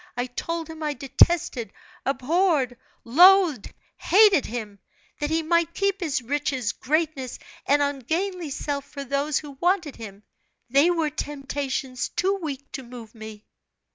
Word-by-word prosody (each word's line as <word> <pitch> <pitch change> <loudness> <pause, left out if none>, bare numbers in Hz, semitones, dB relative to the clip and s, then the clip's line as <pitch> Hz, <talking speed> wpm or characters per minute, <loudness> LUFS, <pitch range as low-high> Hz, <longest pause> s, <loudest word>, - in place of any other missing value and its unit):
I 245 - 0
told 325 +6 -4
him 320 0 -10
I 300 -1 -2
detested, 275 -3 +2 0.4
abhorred, 275 -1 +1 0.3
loathed, 345 - +5 0.3
hated 400 -5 +5
him; 215 -3 -6 0.4
that 295 - -1
he 325 +1 0
might 335 +1 +1
keep 395 -1 0
his 300 -8 -1
riches, 260 -3 -1
greatness, 300 -4 -2 0.3
and 285 +1 +4
ungainly 320 +6 -2
self 280 0 -3
for 280 -1 -7
those 280 +2 0
who 295 -2 -5
wanted 350 -5 +1
him; 205 -2 -10 0.5
they 280 +6 +5
were 325 -3 0
temptations 275 -3 -3
too 390 +2 0
weak 285 -3 -6
to 270 - -5
move 240 -3 -11
me. 220 -1 -10
285 Hz, 140 wpm, -25 LUFS, 255-335 Hz, 0.5 s, loathed